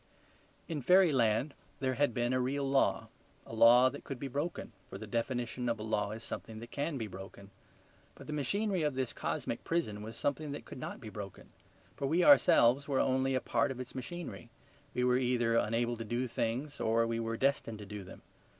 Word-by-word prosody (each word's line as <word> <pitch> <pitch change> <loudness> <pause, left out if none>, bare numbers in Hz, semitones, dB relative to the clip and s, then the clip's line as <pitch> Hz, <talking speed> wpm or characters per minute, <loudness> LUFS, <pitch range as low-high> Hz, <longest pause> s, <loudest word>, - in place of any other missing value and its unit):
In 160 -4 -3
fairyland 140 - +4 0.3
there 130 -1 0
had 145 0 +2
been 120 +1 0
a 130 - +2
real 135 +2 -1
law; 135 0 +2 0.4
a - - -11
law 120 +3 +7
that 140 +2 -5
could 135 - -6
be 140 - -5
broken, 145 +2 -3 0.2
for - - -7
the 110 - -7
definition 120 +2 -2
of 115 - 0
a 105 - -6
law 105 -2 0
is 110 +2 -7
something 110 - -7
that 115 +2 -9
can 145 +1 -2
be 115 - -3
broken. 95 0 -10 0.6
But - - -12
the 150 - -5
machinery 190 - 0
of 150 -3 0
this 130 -2 -1
cosmic 115 - -3
prison 135 -12 -1
was 110 +1 -8
something 145 +1 -2
that 145 - -7
could - - -9
not - - -6
be 110 - -7
broken; 100 -2 -9 0.5
for 140 - -2
we 170 +5 +2
ourselves 140 - +6
were 135 -2 +1
only 130 0 +2
a 130 - +1
part 115 -1 +1
of 130 -1 -5
its 130 0 -7
machinery. 140 -2 -7 0.5
We 125 - +1
were 125 0 +3
either 120 -2 +1
unable 115 +2 +1
to 115 - -4
do 120 +3 -1
things 125 +5 -3
or 115 +1 +2
we 115 0 -1
were 115 0 -2
destined 130 -4 0
to 105 - -9
do 105 0 -7
them. 90 - -12
125 Hz, 205 wpm, -32 LUFS, 115-140 Hz, 0.6 s, law